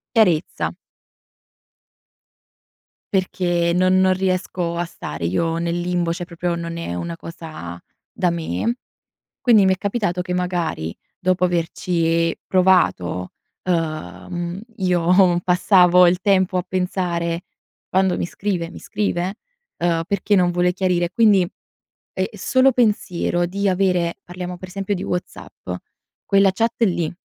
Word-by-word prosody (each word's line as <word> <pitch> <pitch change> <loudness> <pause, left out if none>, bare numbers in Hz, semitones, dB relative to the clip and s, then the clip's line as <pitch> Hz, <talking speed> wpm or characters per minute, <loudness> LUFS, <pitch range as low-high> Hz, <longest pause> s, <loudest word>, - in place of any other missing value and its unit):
Chiarezza. 180 -8 +2 2.4
Perché, 175 -2 +1
non 185 +1 +4
non 190 0 +4
riesco 185 -2 -1
a 175 +1 -1
stare 85 - -6
io 165 - 0
nel 170 +1 -1
limbo, 175 -1 0
cioè 175 +1 -4
proprio 175 0 -3
non 170 0 -5
è 165 - -4
una 170 - -4
cosa 160 - -8 0.3
da 180 - 0
me. 170 - -2 0.6
Quindi 225 -6 +5
mi 190 - +4
è - - -4
capitato 200 -3 -1
che 180 0 -4
magari, 175 - -2 0.2
dopo 185 0 +1
averci 165 -1 +1
provato, 180 - +2 0.3
uhm, 170 - -3 0.2
io 180 -1 +3
passavo 180 0 +5
il 180 +1 +2
tempo 190 -1 +2
a 180 - 0
pensare: 175 -2 -1 0.5
"Quando 190 -1 +2
mi - - -2
scrive? 175 -2 -3
Mi - - -10
scrive?"; 195 -2 -2 0.4
uhm, 170 -1 +1
"Perché 200 +1 +1
non 180 -1 +3
vuole 175 0 +2
chiarire?" 180 -2 0
Quindi 215 -4 +5 0.7
è 185 - -1
è - - -3
solo 260 +6 +3
pensiero 190 -7 +1
di 200 +3 -1
avere 180 -2 +1
parliamo 180 0 -6
per 185 - -9
esempio 195 +1 -2
di 180 - -4
WhatsApp, 180 0 -6 0.6
quella 195 -1 +4
chat 225 +4 0
lì 175 -6 0
180 Hz, 130 wpm, -21 LUFS, 170-190 Hz, 2.4 s, Quindi